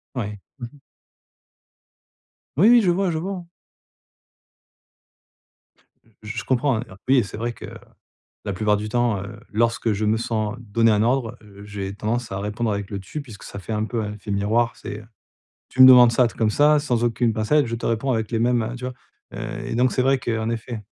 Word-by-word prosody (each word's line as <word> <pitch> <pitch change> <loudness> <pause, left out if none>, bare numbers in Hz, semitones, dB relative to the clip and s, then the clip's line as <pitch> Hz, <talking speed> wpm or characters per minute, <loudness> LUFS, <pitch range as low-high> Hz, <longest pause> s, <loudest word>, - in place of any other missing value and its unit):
Ouais. 105 -4 -4 0.2
Mmh 120 - -5
mh. 145 - -19 1.8
Oui, 190 +8 +6
oui, 240 0 +7
je 185 -4 +3
vois, 185 +1 0
je 160 - -2
vois, 185 +5 -3
hein. 180 -2 -7 2.8
Je 105 +1 -7
je - - -2
comprends, 130 -1 +1
hein, 110 - -3 0.2
oui 135 +1 +5
et 125 - +4
c'est 100 - -8
vrai 120 +2 -2
que - - -10 0.8
la 100 - -2
plupart 105 +2 +1
du 105 +1 -4
temps, 120 -3 +1
heu, 105 +3 -9
lorsque 115 +1 +1
je 105 +1 -2
me 105 +1 +2
sens 110 -2 -2
donné 115 0 +2
un 105 0 +2
ordre, 120 0 0
heu, 100 -1 -14
j'ai 100 -2 -5
tendance 115 +3 -2
à 95 - -3
répondre 105 +3 -2
avec 100 -1 -3
le 100 -2 -4
«tu» 100 +10 -7
puisque 115 -7 -13
ça 100 - -8
fait 100 +3 -6
un 105 0 0
peu 115 +1 -3
un 105 0 -4
effet 105 0 -9
miroir. 110 +4 +1
C'est 105 +1 -7 0.7
tu 130 - -3
me - - +12
demandes 125 -2 +8
ça 125 +1 +4
truc 115 - -7
comme 110 -2 +2
ça, 150 +5 +4
sans 125 -5 0
aucune 120 0 +1
pincette, 115 +7 +2
je 115 - -3
te 115 - -4
réponds 115 +4 0
avec 110 -2 -2
les 115 - 0
mêmes 120 0 +2
heu, 115 +2 -4
tu 125 - -8
vois? 125 0 -4 0.4
Heu, - - -5
et - - -4
donc 125 +2 +2
c'est 130 - +1
vrai 135 +1 +3
qu'en 115 -2 -2
effet 115 -1 -5
115 Hz, 210 wpm, -23 LUFS, 105-125 Hz, 2.8 s, me